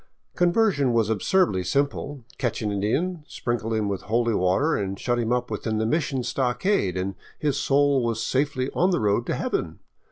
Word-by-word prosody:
Conversion 175 - +2
was 115 -2 +2
absurdly 110 - +2
simple. 140 +5 -1 0.2
Catch 120 -4 -1
an 105 - -1
Indian, 150 - -1
sprinkle 115 -2 -3
him 110 -2 0
with 100 -2 -2
holy 115 0 +2
water, 100 - +2
and 100 -1 -2
shut 120 -1 0
him 115 0 -1
up 125 -1 0
within 110 +1 -2
the 110 - 0
mission 135 0 0
stockade, 125 - 0
and 95 +1 -2 0.2
his 145 -3 0
soul 140 -2 +3
was 115 -1 -1
safely 135 -1 0
on 180 - +2
the 180 - +1
road 105 +2 +1
to - - 0
heaven. - - -2
120 Hz, 180 wpm, -25 LUFS, 110-145 Hz, 0.2 s, soul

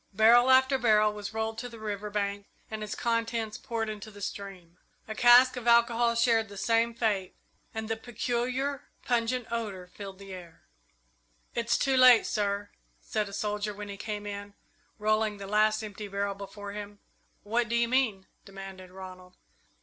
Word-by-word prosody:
Barrel 235 +4 +6
after 260 +1 +5
barrel 215 -3 +4
was 205 -1 -6
rolled 220 0 -3
to 245 +1 -5
the 230 - -11
river 210 -1 -4
bank 200 -1 -2 0.2
and 215 -1 -4
its 210 - -4
contents 230 -2 -1
poured 225 -1 -3
into 215 0 -6
the 205 -1 -13
stream. 190 -4 -7 0.3
A 220 - -4
cask 245 +3 +7
of 245 -1 -6
alcohol 235 0 +4
shared 230 -2 +3
the 200 - -10
same 230 +3 +1
fate, 205 -5 -1 0.4
and 220 0 -5
the 225 - -1
peculiar, 250 +4 -2 0.2
pungent 240 0 0
odour 210 -6 -3
filled 195 +1 -9
the 195 -1 -10
air. 170 -3 -11 0.9
"It's 235 0 +1
too 270 0 +2
late, 255 -2 +8
sir," 205 -1 -1 0.3
said 215 -2 -2
a - - -10
soldier, 210 0 -2
when 205 0 -7
he 200 - -5
came 210 0 -5
in, 205 0 -7 0.4
rolling 215 0 +1
the 200 - -7
last 215 +2 +2
empty 210 0 -7
barrel 200 0 -2
before 200 +1 -8
him. 205 0 -7 0.5
"What 230 +2 0
do 235 - 0
you 235 0 +3
mean?" 230 -7 +1 0.2
demanded 195 -2 -10
Ronald. 185 -1 -11
215 Hz, 170 wpm, -29 LUFS, 200-235 Hz, 0.9 s, late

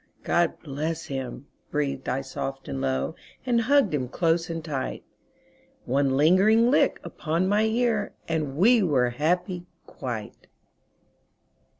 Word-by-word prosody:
"God 175 -1 +1
bless 155 +2 -3
him," 135 0 -5 0.2
breathed 140 -3 -2
I 130 +2 0
soft 135 0 -5
and 135 -1 -4
low, 135 +4 -1 0.3
And 240 -2 +2
hugged 265 - +3
him 130 -4 -1
close 165 +3 +1
and 165 -1 -4
tight. 135 -5 -4 0.8
One 135 +1 +1
lingering 205 - +5
lick - - +3
upon 165 +3 -1
my 210 +2 +3
ear 220 -2 0
And 155 -4 -2
we 230 +6 +5
were 130 -9 +2
happy 175 +6 -1 0.2
quite. 120 -6 -7
160 Hz, 125 wpm, -26 LUFS, 135-190 Hz, 0.8 s, lingering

